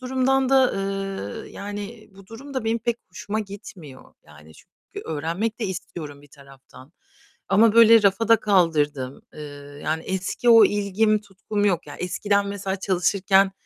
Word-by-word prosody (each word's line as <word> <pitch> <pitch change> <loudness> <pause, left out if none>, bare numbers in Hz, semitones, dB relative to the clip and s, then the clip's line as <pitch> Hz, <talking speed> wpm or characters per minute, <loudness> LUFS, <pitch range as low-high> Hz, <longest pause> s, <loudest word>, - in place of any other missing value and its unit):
durumdan 260 +1 +1
da, 265 -1 +4
ııı, 195 - -4
yani, 205 +2 -8
bu 195 -1 -16
durum 265 +7 -11
da 260 -4 -2
benim 225 +1 0
pek 235 0 -2
hoşuma 205 +4 -4
gitmiyor, 195 -9 -11
yani, 80 +1 -16
çünkü - - -13
öğrenmek 170 +9 -3
de 220 - -1
istiyorum 160 -6 -7
bir 145 - -18
taraftan 135 0 -17 0.6
ama 215 +2 +5
böyle 230 -1 +7
rafa 200 +3 +2
da 230 - +7
kaldırdım, 150 -9 0
ııı, 145 -1 -10
yani 160 +1 -2
eski 190 +5 -1
o 230 -1 +8
ilgim, 205 +1 +1
tutkum 205 +1 -3
yok. 180 -6 0
Ya 145 - -9
eskiden 200 +3 0
mesela 195 -1 -3
çalışırken, 195 +1 +2
195 Hz, 150 wpm, -23 LUFS, 160-220 Hz, 0.6 s, o